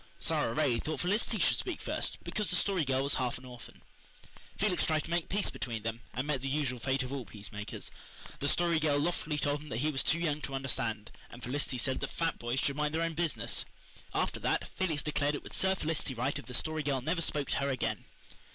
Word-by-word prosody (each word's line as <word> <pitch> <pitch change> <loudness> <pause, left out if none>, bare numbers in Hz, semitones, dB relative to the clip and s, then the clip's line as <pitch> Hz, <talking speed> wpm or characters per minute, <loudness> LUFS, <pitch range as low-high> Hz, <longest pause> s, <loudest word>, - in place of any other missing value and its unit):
Sara 115 - +1
Ray 135 -7 +3
thought 155 +4 -2
Felicity 210 +5 +2
should - - +4
speak 365 -5 -2
first, - - -1
because 210 -2 -1
the - - +2
Story 185 -2 +3
Girl 135 -1 +2
was 140 - +2
half 125 -2 +1
an - - -12
orphan. 125 -2 -11 0.7
Felix 195 -3 +3
tried 155 -1 +2
to - - -7
make 170 -1 +1
peace 200 +1 +1
between 115 -4 -3
them, 115 +1 -2
and 130 +3 0
met 145 -3 0
the 135 - -2
usual 135 -3 0
fate 130 +2 +1
of 130 +1 -4
all 135 -2 -2
peacemakers. 105 -1 -6 0.5
The 140 - 0
Story 170 0 +3
Girl 150 -2 +3
loftily 155 -1 0
told 145 0 +1
him 150 - -10
that 110 - -2
he 150 +5 +2
was 135 - +1
too 165 - +3
young 155 -3 0
to 135 - -3
understand, 120 -5 -2 0.2
and 120 - -11
Felicity 130 +1 -1
said 130 +2 +1
that - - -2
fat 165 -1 0
boys 120 +2 0
should 140 0 +1
mind 150 +1 +1
their 165 - +2
own 165 0 0
business. 165 -1 0 0.5
After - - 0
that, - - +1
Felix 165 -6 0
declared 145 -1 +1
it - - -5
would - - -8
serve 190 0 +3
Felicity 155 -5 -1
right 135 +5 0
if - - -11
the 125 - -3
Story 155 +4 0
Girl 140 -3 0
never 165 +6 0
spoke 145 -4 0
to - - +2
her 140 - +1
again. 130 -4 -1
145 Hz, 235 wpm, -32 LUFS, 130-160 Hz, 0.7 s, should